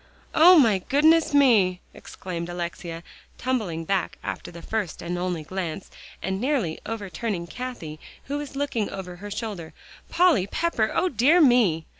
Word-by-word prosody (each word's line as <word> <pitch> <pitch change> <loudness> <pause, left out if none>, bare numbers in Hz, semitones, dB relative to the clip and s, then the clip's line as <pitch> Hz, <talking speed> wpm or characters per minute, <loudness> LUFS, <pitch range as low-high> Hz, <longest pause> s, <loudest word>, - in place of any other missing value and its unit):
"O 345 +3 +8
my 225 -9 +5
goodness 310 - +3
me!" 225 -11 +4
exclaimed 170 -2 -7
Alexia, 170 -1 -5 0.3
tumbling 210 -11 -2
back 195 +1 -1
after - - -5
the 170 -1 -11
first 215 -6 -3
and 175 +1 -3
only 175 -2 -2
glance, 180 +1 -5 0.3
and 190 +1 -2
nearly 250 - -1
overturning 200 -3 -4
Cathie 170 -9 -7 0.2
who 285 +2 -4
was 290 -2 -7
looking 275 -7 -1
over 180 -2 -7
her 205 +3 -8
shoulder. 200 -6 -5 0.4
"Polly 330 - +3
Pepper, 230 -6 0
O 350 +3 +2
dear 290 +4 +4
me!" 235 - +4
205 Hz, 145 wpm, -25 LUFS, 175-265 Hz, 0.4 s, O